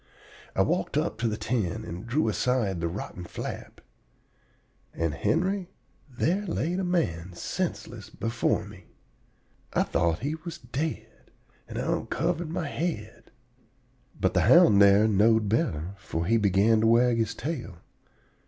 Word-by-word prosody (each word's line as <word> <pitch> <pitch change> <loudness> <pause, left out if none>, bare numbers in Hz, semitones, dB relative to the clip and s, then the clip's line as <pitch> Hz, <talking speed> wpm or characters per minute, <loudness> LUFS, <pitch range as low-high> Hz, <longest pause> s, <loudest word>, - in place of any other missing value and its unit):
I - - +4
walked - - -1
up - - -1
to 120 - +1
the 105 -1 -2
tent 110 -3 -2
and 90 +4 -7
drew 130 +3 +1
aside 110 -5 0
the 85 - 0
rotten 90 0 -6
flap. - - -7 1.1
And, 80 -2 -1
Henry, 185 - 0 0.4
there 170 +10 0
lay 170 0 -1
the 190 +1 -1
man 95 - -1
senseless - - -4
before 115 +1 -1
me! - - -13 0.9
I - - +3
thought 85 +1 0
he 145 +4 -1
was 160 +1 -7
dead, 140 +6 -5 0.4
and - - -7
I - - -1
onkivered 165 +2 -1
my 165 -1 -3
head. 140 -9 -4 0.9
But - - +1
the - - +3
hound 100 -1 +6
here 100 +2 +6
knowed 110 +1 +3
better, 95 - 0
for 85 -4 -4
he 115 +5 +3
began 105 +2 +3
to 110 - +3
wag 120 +1 +4
his 115 0 -1
tail. 150 - -5
115 Hz, 145 wpm, -27 LUFS, 100-155 Hz, 1.1 s, hound